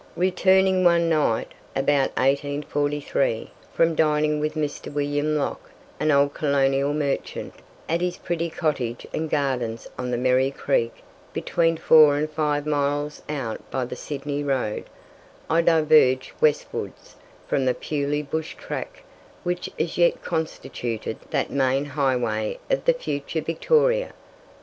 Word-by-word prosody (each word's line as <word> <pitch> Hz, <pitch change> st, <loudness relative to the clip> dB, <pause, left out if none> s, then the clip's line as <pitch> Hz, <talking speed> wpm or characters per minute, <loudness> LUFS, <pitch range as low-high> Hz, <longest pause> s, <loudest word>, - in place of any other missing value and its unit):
Returning 190 Hz, +1 st, +3 dB
one 170 Hz, -1 st, +4 dB
night, 150 Hz, -8 st, +1 dB, 0.3 s
about 135 Hz, 0 st, +2 dB
1843, 145 Hz, -2 st, 0 dB, 0.2 s
from 165 Hz, 0 st, +2 dB
dining 150 Hz, -1 st, +2 dB
with 155 Hz, +1 st, -2 dB
Mr. 150 Hz, -2 st, -3 dB
William 145 Hz, +1 st, 0 dB
Locke, 145 Hz, -, -3 dB, 0.3 s
an 155 Hz, -, +1 dB
old 140 Hz, -1 st, +4 dB
colonial 140 Hz, -1 st, +1 dB
merchant, 145 Hz, -2 st, -2 dB, 0.3 s
at 165 Hz, +2 st, 0 dB
his 180 Hz, 0 st, -1 dB
pretty 170 Hz, 0 st, -2 dB
cottage 135 Hz, -8 st, -2 dB
and 160 Hz, 0 st, -2 dB
gardens 125 Hz, -6 st, -1 dB
on 125 Hz, 0 st, -2 dB
the 120 Hz, -, 0 dB
Merri 130 Hz, +2 st, +3 dB
Creek, 135 Hz, -4 st, -1 dB, 0.3 s
between 165 Hz, -1 st, +1 dB
four 155 Hz, -2 st, +6 dB
and 150 Hz, +1 st, 0 dB
five 150 Hz, -1 st, -1 dB
miles 145 Hz, 0 st, -1 dB
out 130 Hz, -7 st, -3 dB
by 130 Hz, -1 st, -1 dB
the 125 Hz, -, -6 dB
Sydney 145 Hz, +2 st, -4 dB
road, 130 Hz, -7 st, -1 dB, 0.7 s
I 165 Hz, -, +4 dB
diverged 155 Hz, -6 st, +4 dB
westwards 150 Hz, -1 st, -1 dB, 0.3 s
from 135 Hz, -, +1 dB
the 125 Hz, -1 st, +2 dB
purely 145 Hz, +1 st, -2 dB
bush 160 Hz, +2 st, -4 dB
track -, -, -6 dB, 0.4 s
which 180 Hz, 0 st, -2 dB
as 165 Hz, +1 st, -2 dB
yet 170 Hz, 0 st, +3 dB
constituted 155 Hz, -8 st, -3 dB
that -, -, -1 dB
main 135 Hz, 0 st, +1 dB
highway 125 Hz, -7 st, 0 dB
of -, -, +1 dB
the -, -, +5 dB
future 155 Hz, -, -3 dB
Victoria. 480 Hz, -, +2 dB
145 Hz, 130 wpm, -24 LUFS, 135-160 Hz, 0.7 s, four